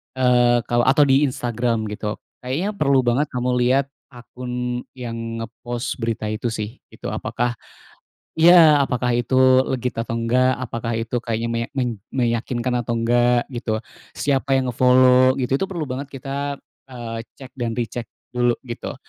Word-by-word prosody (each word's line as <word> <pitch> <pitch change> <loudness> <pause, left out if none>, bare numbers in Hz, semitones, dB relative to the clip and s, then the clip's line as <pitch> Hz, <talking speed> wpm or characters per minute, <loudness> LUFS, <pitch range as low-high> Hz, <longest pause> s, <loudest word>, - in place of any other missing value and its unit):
eee, 120 -2 +3
kalau 120 +3 +1
atau 145 +3 +5
di 140 +1 +4
Instagram, 120 -3 -2
gitu. 105 0 -3 0.2
Kayaknya 140 +11 -2
perlu 140 -9 +2
banget 125 +5 +1
kamu 125 0 -2
lihat 130 +3 +3 0.3
akun 125 0 -5
yang 115 -2 -5
nge-post 120 +2 -5
berita 115 -2 -2
itu 110 +2 -5
sih, 110 +3 -5
gitu. - - -8
Apakah 120 0 -2 0.9
iya. 165 -2 +8
Apakah 125 -2 0
itu 120 +2 -2 0.4
legit 125 -1 -2
atau 115 0 -2
enggak, 125 +3 +2
apakah 115 -2 -4
itu 115 +2 -3
kayaknya 115 -1 -2
meya 115 0 -1
men 125 -3 -1 0.2
meyakinkan 120 0 -1
atau 120 0 -2
enggak, 120 +1 +2
gitu. 115 -2 -2 0.4
Siapa 135 -1 +1
yang 130 -1 -1
nge-follow, 130 +1 +5
gitu, 125 +1 0
itu 195 - -1
perlu 175 -4 -3
banget 135 +2 -4
kita, 140 +1 -4 0.4
eee, 115 -2 -6 0.2
cek 135 -1 -10
dan 120 -2 -1
recheck 120 0 -3 0.3
dulu, 120 -1 +2
gitu. 120 -1 -6
125 Hz, 150 wpm, -22 LUFS, 115-130 Hz, 0.9 s, iya